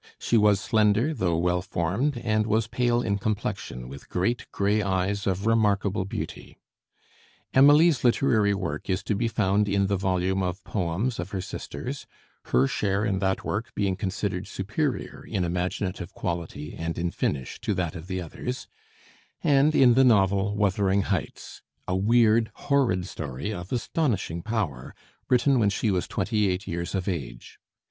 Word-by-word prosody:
She - - 0
was 105 -2 +5
slender, 110 +7 +2
though 90 - 0
well 90 +1 +1
formed, 100 - -1
and 110 -2 0
was 110 +1 +2
pale 120 +1 +1
in 100 -3 0
complexion, 100 - -3
with 70 +2 -11
great 115 +7 -1
gray 100 +2 +1
eyes 100 +1 -1
of 95 +1 -1
remarkable 105 -3 +2
beauty. 95 - -6 1.0
Emily's 145 +1 +6
literary 115 -5 +3
work 90 -6 -4
is 95 +1 0
to 105 - -1
be 115 +4 0
found 105 -2 +1
in 100 0 +2
the 100 0 0
volume 95 0 0
of 90 +1 -3
"Poems" 100 +6 -2
of 85 +2 -4
her 100 -3 -3
sisters, 125 - -6 0.4
her 65 +2 +3
share 100 +7 0
in 100 -3 0
that 95 -1 0
work 115 +5 -3
being 100 -2 0
considered 95 -1 -3
superior 120 +9 -3
in 100 -5 -2
imaginative 90 +1 -3
quality 85 -4 -4
and 80 0 -4
in 85 0 -1
finish 65 -6 -2
to 105 - -1
that 90 -3 -2
of 80 +2 -8
the 95 -1 -3
others; 105 +9 -5 0.8
and 145 +2 +4
in 125 -3 +6
the 135 +3 +5
novel 100 -3 +3
"Wuthering 100 -1 +2
Heights," 95 -6 -4 0.3
a 90 - 0
weird, 110 +2 +3
horrid 125 -11 +1
story 75 +4 -5
of 90 -1 -7
astonishing 115 - -1
power, 90 - -3 0.3
written 130 +1 +4
when 105 -3 +3
she 105 +1 0
was 90 -2 -1
twenty 105 +1 0
eight 90 +1 -2
years 85 +2 -3
of 95 -2 -2
age. 65 -10 -5
100 Hz, 160 wpm, -26 LUFS, 90-110 Hz, 1.0 s, Emily's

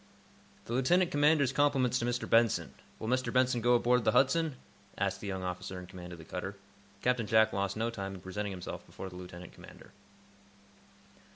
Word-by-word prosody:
"The 115 - -5
lieutenant 170 +8 +3
commander's 145 -2 +4
compliments 135 -3 +2
to 120 - -1
Mr. 120 0 -1
Benson. 115 -1 +3 0.2
Will 110 - -6
Mr. 130 +2 0
Benson 125 -1 +2
go 120 +2 +4
aboard 125 0 +3
the - - +2
'Hudson'?" 150 +2 +3 0.4
asked - - -1
the - - -5
young 95 -1 -3
officer 90 +1 -4
in 90 - -7
command 90 -1 -10
of 85 - -8
the 80 - -12
cutter. - - -5 0.5
Captain 125 -3 +1
Jack 110 0 +4
lost 100 +1 -1
no 115 +1 0
time 95 -3 -5
in 90 - -10
presenting 100 +3 -4
himself 90 -2 -6
before 95 - -8
the 90 - -12
lieutenant 90 -1 -9
commander. - - -14
115 Hz, 185 wpm, -31 LUFS, 95-130 Hz, 0.5 s, commander's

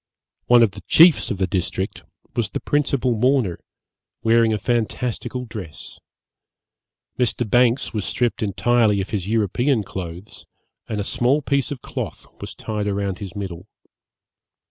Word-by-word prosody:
One 120 -1 +7
of 110 - +3
the - - -11
chiefs 165 -1 +6
of 100 - -2
the 95 - +1
district 95 0 -3 0.3
was 115 -4 0
the - - -3
principal 140 -4 +1
mourner, 120 -5 +1 0.6
wearing 115 0 +4
a 110 - +1
fantastical 120 +3 -2
dress. 100 -9 -9 1.2
Mr. 120 -1 0
Banks 120 +3 +2
was 105 -3 -2
stripped 120 +3 -1
entirely 110 +1 +2
of 95 - -4
his 100 -3 -2
European 115 +3 +1
clothes, 90 0 -8 0.4
and 105 - -2
a - - -1
small 130 +8 +1
piece 140 -1 0
of 140 -4 -6
cloth - - -5 0.2
was - - -7
tied 105 -2 -3
round 100 -2 -2
his 100 -2 -7
middle. 95 -2 -6
110 Hz, 145 wpm, -22 LUFS, 100-125 Hz, 1.2 s, One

